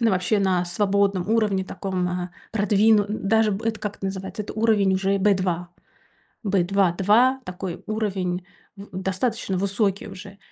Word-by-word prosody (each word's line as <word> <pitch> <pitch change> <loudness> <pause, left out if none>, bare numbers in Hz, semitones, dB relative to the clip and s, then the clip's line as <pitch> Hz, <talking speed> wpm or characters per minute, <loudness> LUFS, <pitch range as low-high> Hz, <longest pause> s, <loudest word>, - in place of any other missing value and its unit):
Но 230 -1 +3
вообще 190 +2 +1
на 185 -2 +2
свободном 200 0 +1
уровне 210 -4 +2
таком, 185 -1 -3
а, 180 0 -3 0.2
продвину 210 0 +4
н 210 -2 -3
даже 220 0 +3
б 200 +4 -4
это 220 -1 -1
как 205 -1 -4
эт - - -32
называется? 190 +1 -4
Это 205 - -7
уровень 215 -3 +2
уже 195 +1 +1
Б2- 185 -3 +1 0.7
Б2, 195 -2 +2
2, 225 +9 +3
такой 180 -1 -6
уровень 190 -5 -2 0.3
в 200 +1 -11
достаточно 190 +1 -1
высокий 200 +1 0
уже, 200 0 -11
195 Hz, 155 wpm, -24 LUFS, 185-210 Hz, 0.7 s, продвину